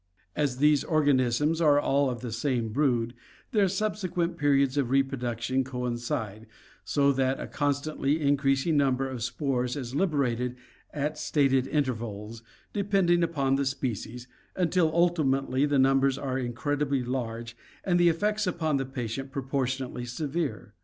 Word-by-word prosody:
As 140 -4 0
these 150 +1 +4
organisms 145 0 +2
are 145 -3 +5
all 140 -1 +2
of 120 -2 -5
the 120 -2 -5
same 120 -1 -1
brood, 120 -2 +1 0.4
their 205 -3 +3
subsequent 185 -3 -1
periods 140 -2 +2
of 140 -4 0
reproduction 130 -2 0
coincide, 120 -3 -4 0.4
so 140 -1 +2
that 130 0 0
a - - -4
constantly 145 +1 -1
increasing 140 +1 +2
number 135 -2 +2
of 130 -3 -6
spores 125 0 -1
is 130 -4 -5
liberated 130 -7 0 0.4
at 150 +1 -3
stated 135 -4 +2
intervals, 115 -6 -3 0.3
depending 195 -4 +2
upon 140 -5 +1
the 140 - +1
species, 125 -2 -4 0.3
until 175 -2 +2
ultimately 145 -5 +2
the 145 -1 +1
numbers 135 0 +3
are 130 -2 -2
incredibly 140 +2 -1
large, 115 -2 -4 0.3
and 175 -2 +2
the 175 0 +6
effects 210 +5 0
upon 160 -5 0
the 135 -1 -2
patient 135 +1 -5
proportionately 130 -2 -2
severe. 135 -3 -3
135 Hz, 135 wpm, -27 LUFS, 125-150 Hz, 0.4 s, the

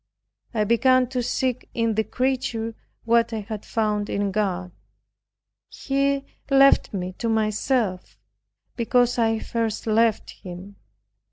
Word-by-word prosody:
I 215 - +2
began 255 +4 +4
to 255 -1 -1
seek 255 +1 -2
in 230 -1 +1
the 220 +1 +1
creature 245 -3 -2 0.3
what 230 0 +3
I 220 - -2
had 210 0 -6
found 210 -2 -1
in 200 -1 -1
God. 185 -3 -1 1.0
He 275 0 -1 0.2
left 275 0 +5
me 185 -2 -4
to 230 - -1
myself, 215 -2 0 0.6
because 245 +1 +2
I 225 -1 +2
first 225 -1 -3
left 225 0 +2
him. 185 +2 -10
225 Hz, 120 wpm, -24 LUFS, 210-250 Hz, 1.0 s, left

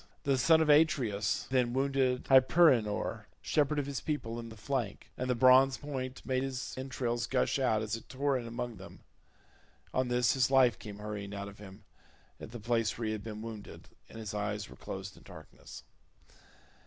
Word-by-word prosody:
The 135 -2 +1
son 160 +5 +5
of 155 - +1
Atreus 135 -10 +2
then 125 -2 +2
wounded 135 -1 +1
Hyperenor 130 -5 +4 0.2
shepherd 150 0 +1
of 145 - 0
his 140 -2 -4
people, 120 -7 -3
in 115 -1 -7
the 110 - -11
flank, 120 -3 -4
and 125 0 -3
the 125 - +2
bronze 130 +2 +6
point 130 -3 -6
made 130 -1 0
his 130 -1 -4
entrails 125 -2 -2
gush 135 +1 +1
out 110 -5 +1
as 110 +1 -2
it 115 - -11
tore 140 +1 0
in 120 -2 -3
among 120 -1 -5
them; 95 +2 -12 0.9
on 130 0 +1
this 125 0 +2
his 130 -3 +2
life 130 -4 +4
came 105 -2 -8
hurrying 105 -1 -6
out 100 0 -5
of 100 - -15
him 95 -2 -12 0.6
at - - -9
the 120 +1 -8
place 115 -1 0
where 115 - -3
he 110 - -1
had 110 -2 -4
been 110 -1 -7
wounded, 110 -3 -9 0.2
and - - -11
his 110 -1 -6
eyes 105 0 -3
were - - -11
closed 95 0 -7
in - - -17
darkness. 75 -5 -12
120 Hz, 190 wpm, -31 LUFS, 105-135 Hz, 0.9 s, bronze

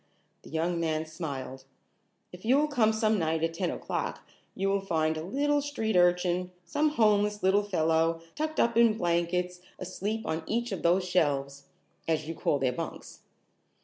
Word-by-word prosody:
The - - -14
young 170 +2 -1
man 160 -1 -1
smiled. 140 -5 -6 0.7
"If 180 +1 -12
you 250 +5 +4
will 300 +1 +3
come 240 -7 +3
some 220 -1 +1
night 160 -1 0
at 165 0 0
ten 165 - -1
o'clock - - -3 0.3
you 195 +1 -1
will 195 0 +1
find 160 -4 0
a 155 - -4
little 290 - +1
street 225 -7 -2
urchin, 180 0 +3 0.2
some 300 - +1
homeless 210 -6 +2
little 190 +2 +4
fellow, 165 -4 +1
tucked 310 +1 -3
up 235 0 +3
in 230 -2 +5
blankets 180 0 0 0.2
asleep 205 +4 -4
on 160 -3 -2
each 235 +1 -1
of 195 - -3
those 180 +2 +2
shelves, 140 -5 0 0.4
as 155 -2 0
you 165 - -3
call 150 - 0
their 130 -2 0
bunks. - - -7
180 Hz, 170 wpm, -29 LUFS, 160-220 Hz, 0.7 s, in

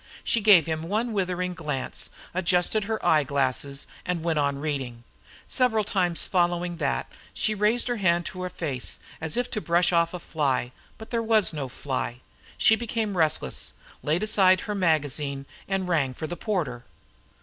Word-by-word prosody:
She 230 - +2
gave 200 -7 +7
him 160 -1 -2
one 225 +3 0
withering 180 -2 -1
glance, 150 -6 -4 0.2
adjusted 180 +3 +2
her 220 +1 -3
eye 155 -2 +5
glass, 140 0 -1 0.2
and 175 -2 -2
went 165 -2 +1
on 140 -1 +1
reading. 135 -5 -4 0.4
Several 240 -5 +2
times 180 -4 0
following 175 -1 +1
that, 140 -4 -1 0.3
she 215 - +1
raised 210 +3 +2
a 245 -1 -1
hand 175 -3 +2
to 185 - -6
her 180 - -2
face, 145 -8 -3 0.2
as 160 +4 -1
if 245 0 -1
to 215 - -2
brush 175 0 +2
off 170 +1 +2
a - - -5
fly. 140 -7 -1 0.3
But 220 - -11
there 230 -1 +1
was 220 -5 +3
no 145 -3 -3
fly. 130 -1 -4 0.4
She 220 - +5
became 220 -3 -2
restless, 160 -3 0 0.3
laid 160 +6 0
aside 190 -4 +5
her 210 - -3
magazine, 145 -6 0 0.2
and 195 -1 -1
rang 145 -7 +1
for 160 - -5
the 175 - -4
porter. 160 - -2
175 Hz, 170 wpm, -26 LUFS, 150-205 Hz, 0.4 s, gave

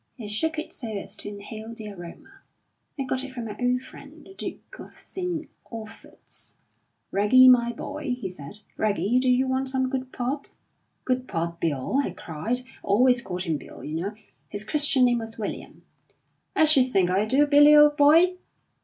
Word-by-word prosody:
He 230 -5 -8
shook 315 +10 -1
it 310 - -5
so 240 - -5
as 195 - -5
to - - -8
inhale 215 +2 -8
the 215 -2 -8
aroma. 195 - -12 0.6
"I - - 0
got 260 0 -2
it 270 -1 -8
from 240 -3 -5
my 210 - -6
old 250 0 +1
friend, 280 +3 -14
the 385 - -14
Duke - - -8
of - - -12
St. 355 -4 -5 0.2
Olphert's. 225 -2 -10 0.6
'Reggie, 210 +6 +6
my 240 -2 +6
boy,' 285 +2 -4
he 195 - -4
said 180 +3 -10 0.2
'Reggie, 215 +3 +1
do 255 0 +1
you 255 +1 +3
want 260 0 0
some 260 -1 -1
good 260 -1 -3
port?' 270 +3 -4 0.5
'Good 255 0 -1
port, 170 -1 -3
Bill!' 150 - -1
I - - -2
cried 195 +11 -3
I - - -17 0.2
always 245 +4 +3
called 180 -5 -4
him 165 -4 -1
Bill, - - -12
you 150 - -6
know; 190 +6 -3 0.3
his 205 - -3
Christian 285 +2 +3
name 240 -1 +2
was 225 0 -8
William 215 - -6 0.7
'I 315 - +5
should 280 -5 +5
think 185 -6 +2
I 200 +3 +1
do, 275 +6 +4
Billy, 290 +1 +7
old 295 0 +7
boy.' 325 +5 +5
250 Hz, 185 wpm, -25 LUFS, 205-280 Hz, 0.7 s, Billy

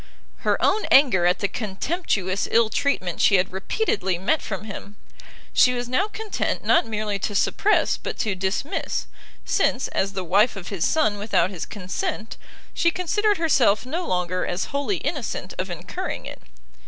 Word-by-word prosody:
Her - - 0
own 430 - +2
anger 240 -11 +5
at 180 - +3
the 200 - +2
contemptuous 200 - -2
ill 225 -1 +3
treatment 185 - 0
she 195 - +5
had 185 0 +2
repeatedly 190 - -1
met 240 - +1
from 195 -1 -5
him, 205 -1 -8 0.6
she 250 -1 +5
was 245 0 -3
now 260 +12 +1
content 430 -1 -3
not - - +3
merely 210 -2 -2
to 205 +2 -3
suppress 420 - +2
but - - -6
to 215 - 0
dismiss, 190 +10 -2 0.4
since, 255 - +1
as 195 +1 -1
the 190 -2 -3
wife 200 +7 +3
of 195 -3 -7
his 195 -5 -1
son 300 -11 +1
without 205 -2 +1
his 180 -4 -6
consent, 215 - -4 0.4
she 340 - +3
considered 410 +4 +1
herself 260 -10 +3
no 330 +7 -3
longer 180 0 -1
as 180 +1 -2
wholly 285 +7 0
innocent 280 - -4
of 185 +1 -2
incurring 180 - -5
it. - - -9
210 Hz, 165 wpm, -24 LUFS, 190-290 Hz, 0.6 s, anger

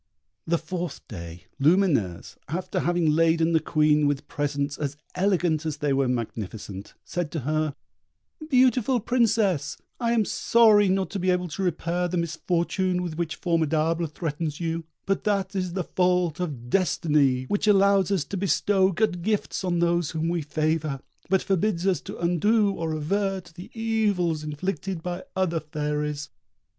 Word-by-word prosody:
The 170 +1 +2
fourth 170 +2 -5
day 85 -4 -8 0.2
Lumineuse, 145 - +2
after 175 +6 -2
having 175 -2 +2
laden 165 +1 +3
the 160 - +5
Queen 150 -1 +3
with 145 -1 -2
presents 145 -1 -2
as 145 -1 -3 0.2
elegant 180 -5 +1
as 155 -3 -3
they 145 -2 0
were 135 -1 +2
magnificent, 110 -4 -5
said 175 -3 -3
to 160 - -2
her, 155 +1 -1 0.7
"Beautiful 255 -2 +3
Princess, 210 - +1 0.2
I 235 -1 +1
am 225 -3 +2
sorry 215 -3 +4
not 190 0 0
to 200 - -3
be 185 +1 0
able 180 0 +1
to 175 - -5
repair 175 0 0
the 180 +1 -2
misfortune 175 +2 0
with 170 -3 -4
which 165 -1 -2
Formidable 165 0 +1
threatens 155 -1 -4
you; 165 -1 -2 0.2
but 195 0 0
that 200 -2 0
is 185 -2 -2
the 185 -1 -1
fault 180 -2 +1
of 135 -9 -5
destiny, 150 -8 +2
which 205 +10 -1
allows 200 -2 +4
us 195 -6 +1
to 195 +8 -5
bestow 195 0 +2
good 190 -2 0
gifts 210 +1 -1
on 180 -2 0
those 170 -2 +1
whom 160 +1 -2
we 170 -1 0
favour, 155 -2 -1 0.3
but 190 -1 +2
forbids 190 -1 0
us 190 -5 +2
to - - -8
undo 200 +5 +2
or 165 -4 -3
avert 190 +3 -2
the 180 +3 -10
evils 205 -8 +1
inflicted 165 +3 -4
by 180 0 -4
other 180 -3 +1
fairies. 150 -1 -3
170 Hz, 155 wpm, -25 LUFS, 150-190 Hz, 0.7 s, the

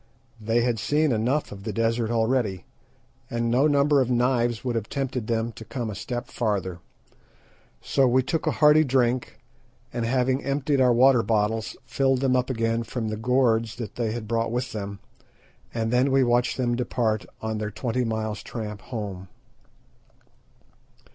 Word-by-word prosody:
They 115 +2 +1
had 120 -2 0
seen 150 +6 +2
enough 125 +7 0
of 100 -1 -9
the 110 +2 -4
desert 115 +1 0
already, 115 -4 0 0.6
and 115 0 -1
no 130 +5 +4
number 145 -1 +3
of 130 - 0
knives 120 -1 +1
would 125 - 0
have 115 -2 -3
tempted 130 -5 -3
them 115 0 0
to 110 - -11
come 115 +1 -4
a - - -5
step 120 +4 -4
farther. 95 -6 -2 1.0
So 135 -1 +2
we 130 +1 +3
took 155 +5 -2
a - - +4
hearty 150 +1 +6
drink, 130 -3 0 0.6
and 120 - -2
having 130 +3 +1
emptied 140 0 0
our 125 -1 +5
water 125 +1 +5
bottles, 110 0 0
filled 135 -1 +1
them 130 -2 +2
up 125 0 +1
again 115 -2 0
from 115 -1 -4
the 110 - -2
gourds 115 -1 +1
that 115 -4 -6
they 115 -3 -2
had 110 -1 -5
brought 115 0 0
with 125 +1 -2
them, 100 -2 -5 0.7
and 115 0 -2
then 125 +3 +3 0.2
watched 120 0 +1
them 120 -2 0
depart 115 -3 -1
on 110 -1 -3
their 105 0 -2
twenty 120 +4 -2
miles' 110 -2 -2
tramp 105 -2 -6
home. 105 -6 -6
120 Hz, 165 wpm, -25 LUFS, 110-130 Hz, 1.0 s, hearty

